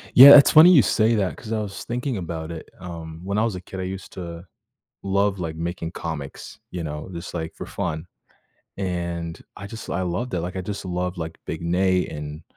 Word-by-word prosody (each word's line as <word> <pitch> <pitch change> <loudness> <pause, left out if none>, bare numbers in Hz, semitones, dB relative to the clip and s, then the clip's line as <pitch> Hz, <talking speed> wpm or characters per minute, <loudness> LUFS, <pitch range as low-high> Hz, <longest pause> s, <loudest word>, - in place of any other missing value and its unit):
Yeah, 140 +3 +12
it's 140 - +7
funny 160 +3 +9
you 160 -7 +8
say 110 +1 +3
that, 100 -4 0
'cause 110 - -9
I 110 -1 0
was 100 -2 -6
thinking 125 +1 -3
about 85 -2 -5
it, 80 -1 -8
um, 85 -2 -8
when 100 +2 -2
I 110 - +3
was 115 -4 -1
a 90 - -6
kid 95 +1 -8
I - - -2
used 95 0 -6
to 85 -1 -7 0.6
love, 100 0 +1
like, 80 -3 -4
making 85 0 -4
comics, 75 -4 -6
you 90 -2 -4
know, 75 -1 -5
just, 85 +1 -7
like, 80 -1 -4
for - - -7
fun 80 +2 -4 0.7
and 85 -3 -3 0.2
I 100 - -7
just 110 +2 -9
I 95 - -1
loved 90 +8 -2
it, 90 - 0
like, 90 +3 -5
I - - -1
just 100 +1 -5
loved, 90 0 -3
like, 80 0 -5
Big 80 - -4
Nate 90 +2 +2
and 75 +1 -7
90 Hz, 215 wpm, -23 LUFS, 85-100 Hz, 0.7 s, Yeah